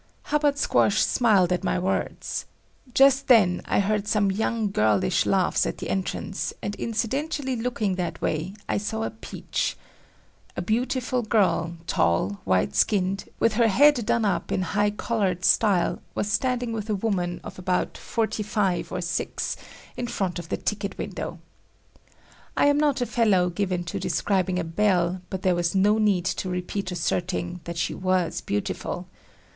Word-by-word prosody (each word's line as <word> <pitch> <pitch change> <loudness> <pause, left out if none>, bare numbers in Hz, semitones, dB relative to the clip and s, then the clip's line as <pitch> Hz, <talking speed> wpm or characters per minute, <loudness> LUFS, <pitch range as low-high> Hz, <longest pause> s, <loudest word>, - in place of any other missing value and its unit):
Hubbard 290 -1 +1
Squash 215 -6 +3
smiled 200 -7 +3
at 180 - -2
my - - +1
words. 185 +2 -2 0.4
Just 270 +2 +5
then 200 -8 +5
I - - +1
heard 205 +1 0
some 205 -2 +2
young 220 +1 -1
girlish 105 - +2
laughs - - +2
at - - -4
the - - -4
entrance, 95 -1 -2
and 205 - -4
incidentally 265 +4 -2
looking 225 -4 -1
that 175 -2 -3
way, 165 +6 -2
I - - 0
saw 220 +2 -3
a - - -2
"peach." 220 - -3 0.8
A - - 0
beautiful 250 +5 0
girl, 200 -7 +1
tall, 95 - +1
white 90 -7 +1
skinned, 190 - +1
with 230 - +3
her 230 +1 +4
head 265 +4 +5
done 230 -2 +2
up 200 - -1
in 185 - +1
"high 205 +1 +3
collared" 200 -4 -1
style, 200 -6 +3
was 205 - -1
standing 245 0 0
with 220 -1 -4
a 210 - +1
woman 185 -4 -1
of - - -9
about 180 0 -1
forty 220 -1 -2
five 200 -3 -1
or 180 - -2
six, 175 0 -2 0.4
in 245 - -3
front 185 -6 -2
of 170 - -9
the - - -1
ticket 205 -1 -3
window. - - -5 1.2
I - - +4
am 285 0 +4
not 290 -3 +2
a - - +2
fellow 200 -8 +2
given 180 -1 -1
to 170 - -4
describing 185 -2 0
a 180 - 0
belle, 180 0 +1
but 190 -1 -5
there 185 - +3
was 175 +1 0
no 205 +3 +4
need 200 -5 +2
to 185 0 -2
repeat 180 +2 -3
asserting 175 +1 -2
that 170 0 -5
she 165 - -1
was 185 -2 0
beautiful. 105 0 -3
200 Hz, 160 wpm, -25 LUFS, 180-225 Hz, 1.2 s, Just